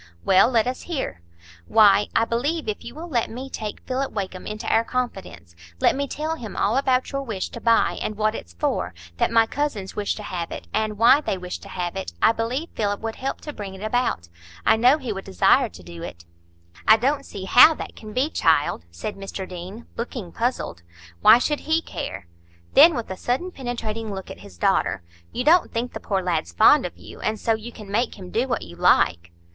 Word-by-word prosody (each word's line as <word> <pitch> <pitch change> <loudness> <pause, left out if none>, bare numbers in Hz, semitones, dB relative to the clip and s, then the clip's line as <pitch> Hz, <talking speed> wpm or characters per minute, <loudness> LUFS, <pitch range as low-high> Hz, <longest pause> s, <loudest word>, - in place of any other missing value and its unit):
"Well, 190 +4 +5
let 230 -4 +3
us 255 +1 -3
hear." 265 - -3 0.5
"Why, 210 -2 +5
I 225 - +4
believe, 285 +8 -1
if 215 - -3
you 235 - -9
will 330 +3 -7
let 245 -8 0
me 260 +3 -7
take 215 -2 -5
Philip 265 +1 -2
Wakem 190 -3 -5
into 215 +2 -6
our 225 - +3
confidence,—let 85 - -3
me 280 +1 -2
tell 310 +4 -3
him 225 -7 -8
all 210 +4 +1
about 260 -1 +1
your 275 -1 -2
wish 220 -8 -4
to 235 - -9
buy, 230 -1 +3
and 215 - -3
what 215 0 +1
it's 85 - -8
for; 85 0 -2 0.2
that - - +2
my 230 -1 +4
cousins 225 -7 -3
wish 205 -1 -1
to 210 - -8
have 175 -4 -4
it, - - -7
and 215 -1 -1
why 235 +6 +6
they 195 - -2
wish 180 0 -6
to - - -12
have 175 -1 -4
it,—I 85 - +1
believe 240 +8 -3
Philip 205 -1 -1
would 225 0 -4
help 270 +1 -4
to 300 - -7
bring 195 -5 -7
it 190 - -9
about. 215 - 0 0.4
I - - +6
know 250 +6 +5
he 255 -7 -4
would 195 -1 -6
desire 90 - +3
to 90 +1 -14
do 85 -1 -10
it." 85 0 -8 0.6
"I 220 - +8
don't 275 +5 0
see 195 -7 -8
how 305 +10 +8
that - - -8
can 215 -1 -10
be, 265 +7 0
child," 150 - +2
said 85 - -6
Mr 195 -1 -6
Deane, 185 +5 -8
looking 230 -6 -5
puzzled. 235 - -2 0.4
"Why 230 - +9
should 295 +4 0
he 320 +1 +1
care?"—then, 85 - +1
with 235 -5 -4
a 190 - -5
sudden 265 - -2
penetrating 225 -5 -4
look 190 -1 -6
at - - -10
his 90 - -14
daughter, 85 - +1 0.3
"You 250 - -2
don't 330 +5 +4
think 240 +2 -3
the - - -5
poor 195 -2 -1
lad's 170 - -1
fond 85 - +6
of - - -14
you, - - -12
and 215 0 -2
so 225 - +1
you 220 +2 -5
can 210 -3 -11
make 230 +3 0
him 185 -2 -10
do 240 +4 0
what 245 -4 -1
you 85 - -11
like?" 85 0 +3
220 Hz, 215 wpm, -23 LUFS, 185-250 Hz, 0.6 s, Why